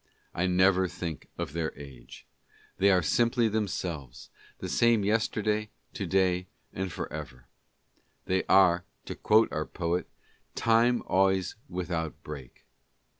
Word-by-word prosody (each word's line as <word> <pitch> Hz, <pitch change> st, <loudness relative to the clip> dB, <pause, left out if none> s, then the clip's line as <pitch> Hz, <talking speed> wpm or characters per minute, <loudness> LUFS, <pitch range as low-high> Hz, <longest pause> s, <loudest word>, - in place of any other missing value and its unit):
I 90 Hz, +2 st, 0 dB
never 95 Hz, +1 st, +4 dB
think 85 Hz, -4 st, -6 dB
of 70 Hz, -, -4 dB
their 80 Hz, -3 st, -3 dB
age. 65 Hz, -4 st, -12 dB, 0.5 s
They 100 Hz, +1 st, +4 dB
are 90 Hz, -2 st, +4 dB
simply 120 Hz, +6 st, +2 dB
themselves 85 Hz, -, -4 dB
— -, -, -26 dB
the -, -, -6 dB
same 115 Hz, -3 st, +3 dB
yesterday, 105 Hz, 0 st, 0 dB, 0.2 s
to -, -, -4 dB
day 90 Hz, -1 st, +1 dB, 0.3 s
and 95 Hz, -1 st, -3 dB
forever. 65 Hz, -5 st, -7 dB, 0.8 s
They 95 Hz, 0 st, +1 dB
are, 90 Hz, -2 st, +5 dB, 0.2 s
to -, -, -5 dB
quote 110 Hz, +1 st, +3 dB
our 75 Hz, -, -2 dB
poet, 85 Hz, +1 st, -2 dB, 0.3 s
" -, -, -42 dB
Time 120 Hz, +2 st, +4 dB
always 95 Hz, -1 st, +2 dB, 0.2 s
without 85 Hz, -3 st, -4 dB
break." 70 Hz, -5 st, -10 dB
90 Hz, 130 wpm, -28 LUFS, 80-105 Hz, 0.8 s, are